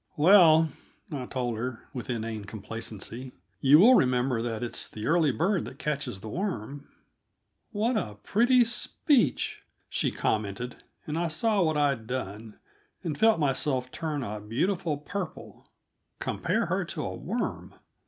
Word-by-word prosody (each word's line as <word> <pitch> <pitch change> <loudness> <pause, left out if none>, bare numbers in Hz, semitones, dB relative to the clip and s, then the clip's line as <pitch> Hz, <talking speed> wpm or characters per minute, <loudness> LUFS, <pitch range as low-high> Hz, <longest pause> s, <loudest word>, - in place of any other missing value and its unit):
"Well," 160 -2 +7 0.4
I 130 -4 -4
told 120 -4 -2
her 125 +1 -5
with 125 -3 -6
inane 110 -3 -3
complacency, 115 +4 -5 0.3
"you 140 +2 +7
will 225 +10 +8
remember 125 - +3
that 115 -1 -3
'it's 120 - -2
the 110 0 -7
early 160 -3 +3
bird 175 - +1
that 135 - -9
catches 140 -9 -3
the 110 - -8
worm.'" 145 - -4 0.8
"What 220 +3 0
a 105 - -3
pretty 240 +3 +4
speech!" 235 - +1 0.3
she - - 0
commented, 110 +3 -2 0.2
and 155 +2 -2
I 170 - +1
saw 200 +6 +1
what 155 -3 +2
I'd 140 -6 +1
done, 110 -3 -5 0.5
and 155 -3 -2
felt 220 +3 +4
myself 135 -3 0
turn 150 -4 -3
a 105 -2 -4
beautiful 150 - -1
purple. 180 +4 -7 0.5
Compare - - 0
her - - 0
to - - -5
a - - -3
worm! - - -4
140 Hz, 145 wpm, -28 LUFS, 115-170 Hz, 0.8 s, will